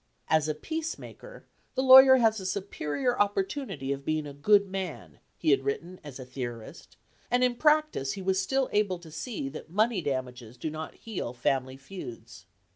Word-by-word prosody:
"As 155 -1 +3
a 155 - -1
peacemaker 325 - -7 0.3
the 260 - +1
lawyer 265 0 +10
has 225 -4 +3
a 190 - -7
superior 200 - -2
opportunity 200 - -1
of 140 0 -3
being 155 +1 -1
a 145 - -8
good 200 +8 +4
man" 190 -3 -6 0.2
he 155 - +2
had 135 -1 +3
written 170 +6 -4
as 145 -4 -9
a 130 - -8
theorist, 120 -3 -8 0.3
and 245 +1 +2
in 250 -1 +3
practice 300 - +2
he 195 - -6
was 190 0 +1
still 265 +6 0
able 205 -3 +1
to 170 -2 -14
see 160 - -4
that 155 +2 -9
money 215 +2 +1
damages 125 -4 -4
do 155 +6 -4
not 155 +1 -7
heal 200 - -5
family 130 +1 -1
feuds. 120 - -10
180 Hz, 175 wpm, -28 LUFS, 140-225 Hz, 0.3 s, lawyer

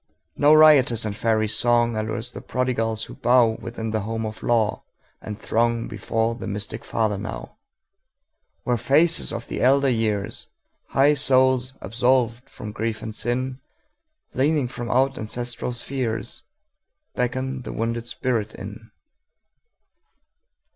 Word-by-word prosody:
No 150 +2 +5
riotous 140 -7 +6
and 105 -1 -3
fairy 110 0 +1
songAllures 115 0 +1
the - - -7
prodigals 115 -3 -1
who - - -8
bowWithin 115 -2 +1
the 110 - 0
home 110 +2 -3
of 110 0 -6
law, 115 -3 +1 0.4
and 105 -1 -6
throngBefore 115 0 -1
the - - -5
mystic 105 +2 -5
Father 110 -3 -1
now, 105 +2 -7 1.1
Where 120 -1 +1
faces 155 +8 +3
of 115 0 -5
the - - -4
elder 135 +1 +4
years, 110 -4 -1 0.4
High 140 +2 +4
souls 130 -2 +3
absolved 120 +2 +1
from 105 - -8
grief 110 +1 -3
and 110 - -5
sin, 125 +4 -2 0.7
Leaning 145 0 +1
from 120 -1 -6
out 135 +2 +2
ancestral 120 +3 -3
spheresBeckon 130 +1 -5
the - - -6
wounded 115 +1 -3
spirit 115 -4 -2
in. 105 +3 -9
120 Hz, 120 wpm, -23 LUFS, 110-130 Hz, 1.1 s, riotous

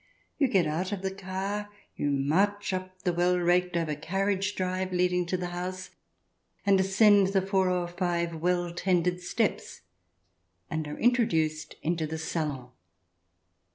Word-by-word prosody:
You 280 - +4
get 190 -8 +3
out 165 +6 -2
of 195 -2 -4
the 190 0 -2
car, 195 +2 -4 0.3
you 145 - -1
march 190 +10 +1
up 185 0 -5
the 180 - +1
well 175 +1 +2
raked 180 0 +2
over 165 -2 -1
carriage 195 +6 -1
drive 185 0 -2
leading 180 -1 +1
to 185 - 0
the 180 0 -4
house, 185 +1 -5 0.7
and 200 -1 +5
ascend 195 +1 +5
the 195 0 +2
four 190 -1 +2
or 180 -1 0
five 175 -1 -1
well 175 +1 0
tended 180 0 +1
steps, 175 - -2 0.9
and 155 -1 -2
are 150 - -6
introduced 160 -11 +1
into 165 -1 0
the 160 +1 -4
salon. 150 -6 -3
180 Hz, 150 wpm, -28 LUFS, 170-190 Hz, 0.9 s, and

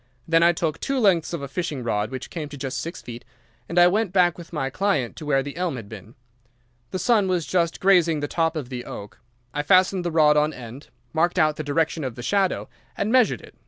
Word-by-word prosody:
Then 165 0 +4
I 170 +1 +6
took 160 -2 -2
two 275 - -2
lengths 195 -9 +3
of 170 -5 -4
a - - -4
fishing 145 -3 -4
rod, 105 -2 -1
which 130 0 -7
came 155 -4 -5
to 145 - -9
just 135 -1 -4
six 165 +2 -7
feet, 120 0 -8 0.5
and 170 - -4
I 175 - +8
went 200 +2 +2
back 180 -2 +3
with 170 -2 -12
my 135 -5 -2
client 190 -9 0
to 155 - -8
where 135 -2 +2
the 140 0 -7
elm 175 -4 -2
had 115 -5 -8
been. 110 +2 -11 0.7
The - - -3
sun 215 -1 +2
was 180 -4 0
just 170 -2 0
grazing 175 -5 +4
the 145 - -2
top 165 +1 0
of 145 -6 -4
the 125 -2 -5
oak. 100 0 -9 0.3
I 145 - -1
fastened 185 +3 +3
the 175 - -1
rod 155 -2 +4
on 150 +1 +2
end, 125 +3 -10 0.3
marked 175 +3 +1
out 155 -3 +3
the 155 - -3
direction 160 +2 0
of 130 -4 -4
the 120 - -8
shadow, 190 +8 0 0.3
and 205 +2 -1
measured 255 -2 +3
it. - - -15
160 Hz, 235 wpm, -24 LUFS, 135-180 Hz, 0.7 s, I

